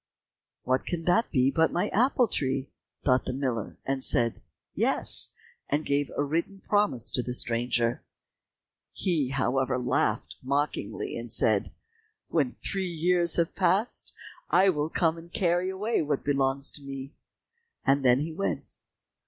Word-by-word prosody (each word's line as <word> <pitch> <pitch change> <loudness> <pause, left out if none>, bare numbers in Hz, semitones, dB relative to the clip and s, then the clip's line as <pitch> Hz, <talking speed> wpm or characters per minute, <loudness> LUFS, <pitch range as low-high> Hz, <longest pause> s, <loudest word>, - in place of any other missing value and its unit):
"What 130 0 +1
can 170 -2 -2
that 180 +7 +2
be 130 -1 +2
but 160 +1 +2
my 175 - 0
apple 250 +2 +3
tree?" 135 -6 -2 0.3
thought 130 -2 +3
the 130 - -2
miller, 125 -5 -3
and 135 -1 -1
said, 115 -1 +2 0.3
"Yes," - - +2 0.4
and 150 +2 0
gave 140 0 0
a 145 - +2
written 170 +7 -2
promise 135 - +2
to 125 - +1
the 125 0 -3
stranger. 120 0 0 0.9
He, 160 -8 0
however, 130 -1 0
laughed 120 -3 -1
mockingly 140 -4 -2
and 115 -1 -4
said, 105 -2 +3 0.6
"When 145 -7 0
three 190 -2 -2
years 170 +1 +2
have 170 -1 +1
passed, 195 +4 0 0.4
I 195 +1 +5
will 150 -3 0
come 165 0 +1
and 170 +1 -14
carry 175 0 +1
away 210 +5 -1
what 145 -2 -1
belongs 140 -1 +1
to 145 - -7
me," 135 0 -7 0.7
and 140 0 +3
then 125 +1 +4
he 160 +2 -3
went. 195 +5 -3
145 Hz, 145 wpm, -27 LUFS, 130-175 Hz, 0.9 s, I